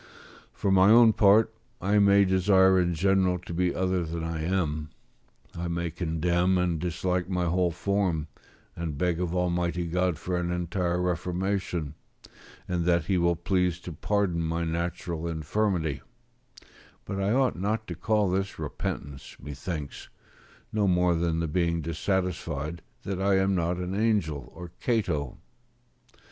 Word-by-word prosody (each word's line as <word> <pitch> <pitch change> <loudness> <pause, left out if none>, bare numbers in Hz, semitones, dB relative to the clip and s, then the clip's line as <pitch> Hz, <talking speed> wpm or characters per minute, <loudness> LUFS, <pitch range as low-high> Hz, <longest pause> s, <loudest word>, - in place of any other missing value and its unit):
For 100 - -1
my 95 +1 +6
own 115 0 +7
part, 110 +2 +5 0.3
I 100 +2 +2
may 100 0 +5
desire 95 0 +4
in 90 -1 +1
general 95 0 +2
to 90 -1 -9
be 90 +1 0
other 95 -1 0
than 80 0 -4
I 80 -1 -3
am; 80 -4 -1 0.7
I 85 +1 -3
may 85 0 -2
condemn 85 +2 +1
and 90 -2 0
dislike 90 +1 -1
my 90 -2 0
whole 90 +1 +2
form, 90 -3 -1 0.5
and 80 -4 -4
beg 85 +1 0
of 90 -1 -2
Almighty 90 -1 0
God 90 0 0
for 90 +1 -3
an 85 0 -2
entire 90 0 -1
reformation, 90 -2 -2 0.7
and 90 -2 -1
that 85 -2 +2
He 95 +1 +1
will 85 0 +2
please 90 0 0
to 90 - -7
pardon 95 -1 0
my 85 +1 -1
natural 85 0 -3
infirmity: 80 -2 -1 1.0
but 100 0 -3
I 100 +1 +1
ought 130 0 +2
not 110 +3 -1
to - - -5
call 105 -2 +1
this 95 +1 -1
repentance, 70 -1 -5
methinks, 75 +1 -6 0.6
no 105 -2 +2
more 90 -1 +3
than 85 -1 0
the 85 - -1
being 85 +1 0
dissatisfied 85 -2 -2 0.2
that 95 -1 -3
I 100 0 +3
am 95 +1 +2
not 85 -1 0
an 90 +1 -4
angel 100 -9 0
or 85 0 -9
Cato. 85 - -1
90 Hz, 150 wpm, -27 LUFS, 85-95 Hz, 1.0 s, own